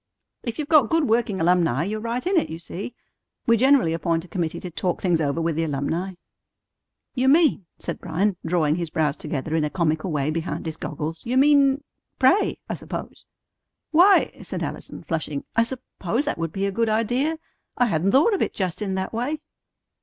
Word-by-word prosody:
If 235 -2 -5
you've 300 -2 -3
got 300 -7 +5
good 325 -1 +3
working 220 -3 +1
alumni, 165 -5 +2
you're 210 +4 -3
right 235 +4 -3
in 380 +2 +1
it, 335 - +2
you 160 - -5
see. 195 +7 -7 0.5
We 230 - +5
generally 260 -7 +4
appoint 165 +1 -1
a - - -14
committee 170 -4 -3
to 180 - -6
talk 180 +2 -1
things 175 -4 +1
over 145 +1 0
with 165 -1 0
the 165 - 0
alumni." 160 +5 -2 1.0
"You 255 0 +1
mean," 290 - +4
said - - -5
Bryan, 185 +4 0
drawing 160 -2 +1
his 170 -2 -3
brows 150 -2 0
together 155 0 -3
in 160 - +2
a 150 - 0
comical 160 +2 0
way 150 0 0
behind 165 +2 -3
his 160 -1 -3
goggles, 155 +1 -5
"you 245 +2 -1
mean 280 0 +5 0.3
pray, - - +3
I - - -3
suppose." - - -7 0.6
"Why," 365 +5 +6
said - - -4
Allison, - - -6
flushing, 155 -4 -3
"I 230 - +5
suppose 235 - -3
that 295 - -2
would 165 -1 -2
be 195 +4 -2
a 200 - 0
good 230 +3 0
idea. 245 +9 +1 0.4
I 245 - +4
hadn't 180 -3 +1
thought 300 - +5
of 395 - 0
it - - -1
just 185 0 -2
in 195 -2 -1
that 190 +3 -3
way." 250 +7 -1
190 Hz, 195 wpm, -24 LUFS, 165-250 Hz, 1.0 s, Why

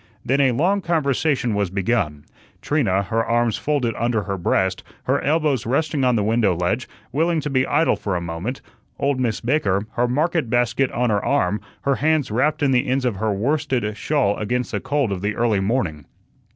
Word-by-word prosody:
Then 135 +2 +2
a 135 -2 +4
long 180 +11 +1
conversation 145 - 0
was 100 -2 0
begun, 95 -6 -1 0.3
Trina, 100 -11 +1
her 115 +4 0
arms 115 -1 +1
folded 140 -6 0
under 115 -2 0
her 100 -1 -3
breast, 95 +1 0 0.2
her 135 +2 0
elbows 145 -6 +1
resting 145 +2 0
on 125 -1 +3
the 105 - +1
window 110 -3 +2
ledge, 90 +8 -1 0.2
willing 165 +4 +1
to 150 - -4
be 130 -1 +2
idle 160 +3 +2
for 100 -3 -3
a - - 0
moment; 85 +10 -5 0.4
old 140 -1 0
Miss 120 -4 -1
Baker, 110 -7 +1
her 120 +1 0
market 155 +1 0
basket 120 +2 +1
on 120 -1 0
her 100 -1 +1
arm, 100 +4 +1 0.2
her 140 -1 +1
hands 155 -4 +1
wrapped 145 +7 +1
in 140 - +3
the 125 -1 +2
ends 130 0 0
of 115 -6 0
her 110 +1 0
worsted 120 -1 -1
shawl 130 -3 +1
against 125 +4 -2
the - - -1
cold 135 -4 0
of 95 -2 -3
the 105 +1 -1
early 115 -4 +1
morning. 95 - -1
120 Hz, 190 wpm, -22 LUFS, 105-140 Hz, 0.4 s, a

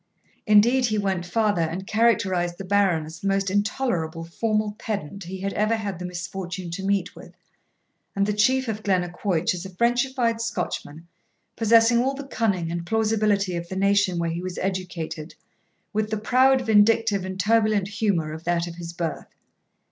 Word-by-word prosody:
Indeed 235 +5 +5
he 215 -1 0
went 190 -4 -1
farther, 205 -1 +1
and 165 +4 -2
characterised 190 -6 +1
the 195 - -7
Baron 190 -5 +2
as 160 +1 -10
the 195 - -3
most 195 -1 +1
intolerable 190 -6 -1
formal 215 +5 -1
pedant 200 -3 -5
he 185 +2 -7
had 195 0 -2
ever 215 +2 +1
had 200 -5 -4
the 180 - -5
misfortune 180 0 -6
to 190 +3 -5
meet 200 0 0
with, - - -13 0.8
and 200 0 +2
the 210 - 0
Chief 260 +5 +2
of 215 -1 -3
Glennaquoich 185 0 0
as 180 -1 -5
a 190 - -7
Frenchified 235 +3 +1
Scotchman, 175 -7 -4 0.5
possessing 230 +1 +4
all 265 +3 0
the 280 - -6
cunning 195 -10 -1
and 170 0 -3
plausibility 210 -2 +1
of 170 0 -5
the 190 - -5
nation 200 -1 +2
where 170 -1 -1
he 170 +1 -4
was 185 -1 -5
educated, 180 -4 -4 0.6
with 215 0 0
the 220 - -1
proud, 260 +4 +3
vindictive, 220 -2 +3
and 190 0 -6
turbulent 215 -1 +2
humour 200 -7 -1
of 160 +1 -8
that 170 0 +1
of 170 -1 -8
his 170 -1 -7
birth. 165 -2 -4
200 Hz, 170 wpm, -24 LUFS, 175-220 Hz, 0.8 s, Indeed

